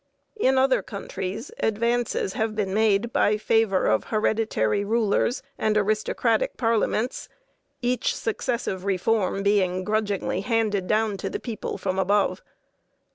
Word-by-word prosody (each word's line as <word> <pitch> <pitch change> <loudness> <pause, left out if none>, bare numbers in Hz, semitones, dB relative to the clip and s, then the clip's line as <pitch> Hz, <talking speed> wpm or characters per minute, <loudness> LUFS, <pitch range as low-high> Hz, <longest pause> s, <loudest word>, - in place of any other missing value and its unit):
In 265 -11 +2
other 260 0 +3
countries 200 - -6
advances 235 -2 0
have 220 0 -1
been 200 -3 -1
made 220 +2 +2
by 210 +1 +3
favor 215 -3 +2
of 110 - +2
hereditary 215 - 0
rulers 225 +3 +1 0.2
and 215 -1 +2
aristocratic 215 - +1
parliaments, 225 0 0 0.5
each 245 -1 0
successive 225 -4 -2
reform 195 +1 0
being 185 -3 +2
grudgingly 205 -3 -1
handed 210 -4 0
down 215 -1 +1
to - - -4
the - - -4
people 230 -4 -5
from 190 0 -2
above. 200 +2 +1
215 Hz, 125 wpm, -25 LUFS, 195-225 Hz, 0.5 s, other